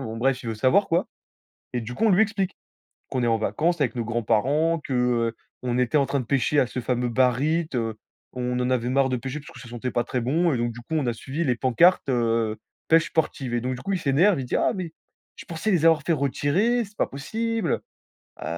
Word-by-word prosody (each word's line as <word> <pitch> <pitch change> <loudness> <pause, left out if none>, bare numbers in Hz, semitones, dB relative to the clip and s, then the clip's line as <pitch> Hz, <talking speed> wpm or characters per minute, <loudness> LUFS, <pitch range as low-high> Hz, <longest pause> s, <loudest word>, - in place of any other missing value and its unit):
Bon 115 -3 -5
bref, 130 +2 0
il 115 - -6
veut 110 - -2
savoir, 130 - +3
quoi. 170 +2 +1 0.7
Et 125 - -1
du 120 +2 -6
coup, 225 - -1
on - - +4
lui 190 +4 +5
explique 200 -3 -1 0.5
qu'on 125 -2 -1
est - - +2
en 115 -1 +3
vacances 160 +8 0
avec 125 -2 0
nos 115 -2 -2
grands-parents, 130 +8 +1
que, 135 - -4
heu, 120 -2 +1 0.3
on 125 0 -1
était 125 +4 +2
en 140 - +3
train 140 - -1
de 125 - -4
pêcher 140 +3 +2
à 125 - +2
ce 125 - -4
fameux 125 0 -1
Barit, 135 +7 +2
heu, 115 -2 -1 0.4
on 125 0 -2
en 125 - 0
avait 125 -1 0
marre 135 +1 +2
de 125 - 0
pêcher 135 +5 -5
parce 150 - -13
que - - -13
ça 120 - -11
sentait 120 +1 -4
pas 120 - 0
très 125 - -2
bon, 160 +6 +1
et - - 0
donc 120 0 -1
du 120 +1 -10
coup, 160 - -8
on 140 -5 0
a 120 - +1
suivi 140 +8 -4
les 125 -5 +1
pancartes, 135 +7 +3
heu, 115 -3 +1 0.3
«pêche 165 +2 +5
sportive» 140 -6 -1
et 120 - 0
donc 130 +1 -2
du 125 - -9
coup, 195 0 -2
il - - +1
s'énerve, 160 +5 +3
il 130 - -3
dit: - - -2
«Ah - - +2
mais, 175 -4 -5 0.4
je - - -10
pensais 175 +6 -2
les 165 -3 +2
avoir 160 -2 +5
fait 165 +1 +1
retirer, 160 - +1
c'est 205 +1 -20
pas - - +1
possible. 220 +8 -2 0.6
Heu, - - -5
130 Hz, 250 wpm, -24 LUFS, 120-165 Hz, 0.7 s, lui